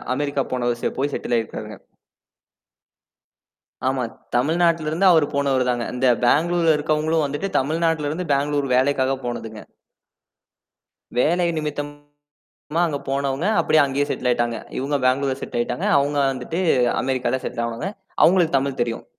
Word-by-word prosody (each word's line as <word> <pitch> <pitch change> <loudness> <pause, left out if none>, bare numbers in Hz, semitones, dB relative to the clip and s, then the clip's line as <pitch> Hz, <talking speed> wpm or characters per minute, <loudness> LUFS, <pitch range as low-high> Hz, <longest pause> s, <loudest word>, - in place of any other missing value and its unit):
America 140 0 -1
போன 125 -1 -1
வருசியா 120 -1 -2
போய் 145 +1 0
settle 120 - -1
ஆயிருக்காருங்க. 110 -2 -5 2.1
ஆமா. 130 -1 0 0.3
தமிழ்நாட்டில 165 +4 +2
இருந்து 185 +5 +1
அவரு 160 -3 +4
போனவருதான்ங்க. 130 -4 +1
இந்த 130 +1 +1 0.2
பெங்களூர்ல 165 +4 +3
இருக்கிறவங்களும் 155 +1 0
வந்துட்டு 145 +8 -3
தமிழ்நாட்டில 160 +1 0
இருந்து 170 +1 -4
பெங்களூர் 145 0 0
வேலைக்காக 135 0 +2
போனதுங்க. 115 -3 -5 1.6
வேலை 175 +7 +2
நிமித்தமா 145 -1 -6 0.6
அங்க 145 -3 -2
போனவங்க 140 +3 -1
அப்படியே 155 - +3
அங்கேயே 140 +1 0
செட்டில் - - -1
ஆயிட்டாங்க. 120 -2 0 0.2
இவங்க 140 +3 -1
பெங்களூர்ல 130 +1 +1
செட்டில் 120 - -3
ஆயிட்டாங்க. 120 - -2
அவங்க 145 +1 0 0.2
வந்துட்டு 135 +7 -4 0.4
அமெரிக்கால 130 0 -1
செட்டில் 120 - -3
ஆனவங்க. 115 +11 -4 0.4
அவங்களுக்கு 170 -4 +4
தமிழ் 135 -1 -3
தெரியும். 115 -1 -4
140 Hz, 125 wpm, -22 LUFS, 130-155 Hz, 2.1 s, அவரு